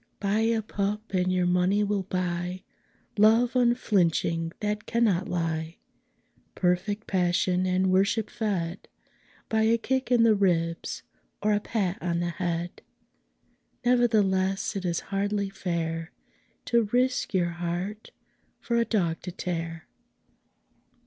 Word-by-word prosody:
Buy 205 +1 +1
a 225 0 +1
pup 210 +1 -3
and 185 0 +1
your 180 -1 +1
money 180 +3 +2
will 205 -1 0
buy 180 0 -3 0.6
Love 225 +4 +5
unflinching 185 -9 +2
that 210 0 -2
cannot 210 -6 +1
lie 165 -1 -2 0.8
Perfect 190 +4 0
passion 180 0 +1
and 185 +1 +2
worship 200 +3 +2
fed 190 -5 -3 0.6
By 220 0 +1
a 225 +1 +4
kick 260 +3 -1
in 240 -2 +5
the 225 -1 +6
ribs 170 -4 0 0.4
or 210 0 +3
a 205 - +2
pat 200 -4 -2
on 170 -1 -1
the 175 0 -1
head. 170 0 -3 1.0
Nevertheless 205 -7 +2
it 195 -2 -3
is 170 -1 0
hardly 200 0 0
fair 165 -3 -3 0.5
To 235 -2 +3
risk 250 -3 +1
your 175 -2 +2
heart 175 +5 -4 0.5
for 235 - -1
a 235 - +3
dog 175 -8 0
to 180 - -6
tear. 165 -2 -4
190 Hz, 125 wpm, -27 LUFS, 175-215 Hz, 1.0 s, the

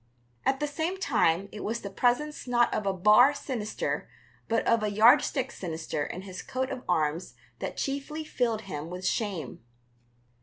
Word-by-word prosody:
At 270 0 +2
the 295 - 0
same 320 +6 -2
time 200 - +2
it 210 - -7
was 230 +2 -2
the 200 - -6
presence 255 +8 0
not 240 -1 +3
of 205 - -1
a - - +3
bar 210 +9 +6
sinister 240 -7 -3 0.4
but 230 0 +1
of 230 -1 +3
a 210 - 0
yardstick 250 +5 +4
sinister 160 -4 -4
in 185 +5 -6
his 185 -1 -7
coat 260 +1 -3
of 260 -2 -4
arms 160 0 0 0.2
that - - -5
chiefly 285 +3 -3
filled 240 -7 -1
him 160 -6 -6
with 180 +1 -6
shame. 190 - -2
225 Hz, 165 wpm, -28 LUFS, 185-270 Hz, 0.4 s, bar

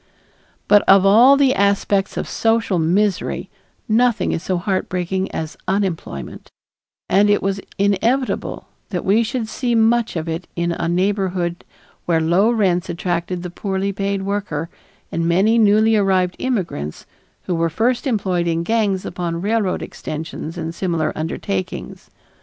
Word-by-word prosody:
But 205 0 +6
of 195 0 +7
all 240 +8 +7
the 275 -2 +4
aspects 200 0 +1
of - - -2
social 225 -5 +1
misery 190 +5 0 0.4
nothing 235 +1 +2
is - - -2
so 185 0 -1
heartbreaking 185 0 -2
as 160 -1 -5
unemployment, 185 - -3 0.6
and 205 +1 +4
it 205 - +2
was 195 0 -1 0.2
inevitable 225 +7 0 0.2
that 180 -4 -3
we 205 +4 +4
should 235 0 -2
see 240 +2 -1
much 230 0 +2
of 165 0 -3
it 165 +2 -4
in 170 0 -1
a 170 0 -2
neighborhood 180 -1 -1 0.4
where 165 -2 +3
low 175 +7 +3
rents 190 -6 +1
attracted 175 +1 -2
the 180 - -6
poorly 195 +1 -2
paid 195 0 -2
worker 195 -6 -3 0.4
and 165 0 -1
many 205 +7 +3
newly 220 +1 +4
arrived 190 -3 +2
immigrants 175 - -3 0.4
who 180 - -2
were 165 0 +1
first 240 - 0
employed 185 -7 0
in 165 0 0
gangs 205 -2 0
upon 170 -1 -3
railroad 210 -3 0
extensions 160 +1 -6
and 165 -1 -4
similar 170 -3 -1
undertakings. 100 - -4
190 Hz, 140 wpm, -20 LUFS, 170-215 Hz, 0.6 s, of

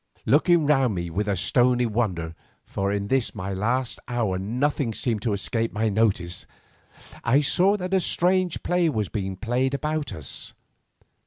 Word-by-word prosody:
Looking 160 +3 +4
round 135 -7 +3
me 85 -1 -4
with 105 +5 -1
a 100 - +1
stony 125 +6 +3
wonder, 100 -8 -1 0.3
for 100 0 -2
in 100 0 -2
this 130 0 0
my 95 -1 -4
last 120 +6 -1
hour 110 -7 -1
nothing 120 +3 -1
seemed 115 -5 -1
to 110 -2 0
escape 115 +3 -1
my 110 +1 0
notice, 95 -5 0 0.8
I 130 +5 +4
saw 185 +8 +3
that 185 -1 -4
a 190 - +5
strange 180 0 +1
play 175 -2 +2
was 110 - -1
being 95 -2 -3
played 125 +6 0
about 150 +1 -2
us. 80 -4 -6
115 Hz, 160 wpm, -25 LUFS, 100-145 Hz, 0.8 s, a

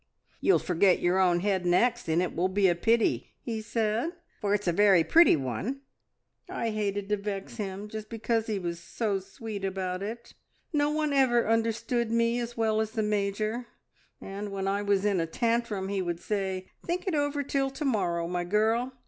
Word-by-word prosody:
`You'll 390 - +5
forget 180 +1 +3
your 180 +2 +2
own 175 -2 +3
head 190 -2 +1
next, 235 +7 +2
and 165 +2 +2
it 180 - -4
will 175 +3 +2
be 195 +1 +2
a 175 - +4
pity,' 225 +6 +1
he 225 -2 -4
said, 225 +7 -1 0.3
`for 205 -1 +2
it's 205 -2 -3
a - - +4
very 195 -1 +5
pretty 335 - +6
one.' 150 - -3 0.7
"I 230 - -2
hated 205 -2 -2
to 210 - +2
vex 200 +3 -5
him 200 -1 -4
just 215 0 -7
because 225 0 -1
he 215 -2 -1
was 170 -2 -4
so 200 +3 -2
sweet 200 +2 -7
about 190 -1 -2
it. 230 +4 -6 0.4
No 290 -1 +2
one 305 -1 0
ever 250 -4 +3
understood 230 +1 0
me 230 +1 +2
as 235 0 -5
well 220 -1 +2
as 220 0 -3
the 220 -2 0
Major, 210 +3 -1 0.5
and 200 +1 -6
when 195 -1 -3
I 200 +1 0
was 200 -1 +1
in 200 -3 +2
a 165 - 0
tantrum 230 0 -1
he 195 -1 -1
would 175 -2 -3
say, 190 -2 -3
`Think 350 +1 -2
it 375 - -1
over 290 -1 0
till 270 0 0
to 290 +3 -5
morrow, 175 -9 0
my 175 0 -2
girl. 220 +7 +1
210 Hz, 190 wpm, -28 LUFS, 190-235 Hz, 0.7 s, pretty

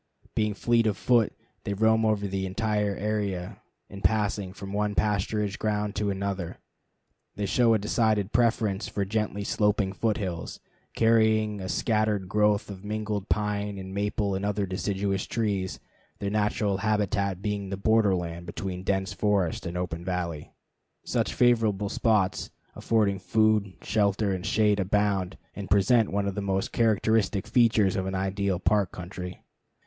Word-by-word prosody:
Being 105 -2 0
fleet 115 0 +2
of 105 - 0
foot, 120 -4 +3 0.3
they 100 - -2
roam 110 +2 +3
over 105 -2 +1
the 95 0 -2
entire 105 0 0
area 100 -4 -3 0.3
in 100 0 -10
passing 100 -1 +1
from 100 0 -8
one 105 0 0
pasturage 105 0 0
ground 105 -1 -1
to 105 0 0
another. 100 -3 -3 0.8
They 105 - -2
show 115 +3 +3
a - - +4
decided 105 -1 +1
preference 110 -4 +1
for 100 - -2
gently 105 0 -2
sloping 105 -1 +1
foot 110 +2 0
hills 90 -4 -4 0.4
carrying 110 -2 +3
a 95 - -5
scattered 105 -3 0
growth 105 +1 +2
of 95 -1 -9
mingled 105 -1 -3
pine 105 -1 -1
and 95 0 -7
maple 100 0 -1
and 95 +1 -2
other 100 0 0
deciduous 95 +1 -2
trees, 100 -5 -1 0.4
their 100 0 -3
natural 105 -1 +1
habitat 100 -2 0
being 100 -2 -2
the 95 - -3
border 105 -1 +3
land 85 -1 -5
between 90 +1 -5
dense 95 0 -1
forest 100 -5 0
and 85 +1 -4
open 85 -2 -3
valley. 85 -4 -3 0.5
Such - - -1
favorite 110 -5 +2
spots 105 -5 +1 0.3
affording 105 -4 +1
food, 110 -1 +2
shelter, 100 -1 +1
and 90 -1 -4
shade 105 -2 +3
abound, 100 -1 0 0.2
and 100 -3 -6
present 105 +4 +4
one 100 0 0
of 100 - -1
the 100 - -3
most 95 -1 -1
characteristic 110 -3 +2
features 110 -5 +3
of 95 -1 -1
an 95 - -3
ideal 95 0 0
park 100 0 +1
country. 90 0 -7
100 Hz, 155 wpm, -27 LUFS, 95-105 Hz, 0.8 s, a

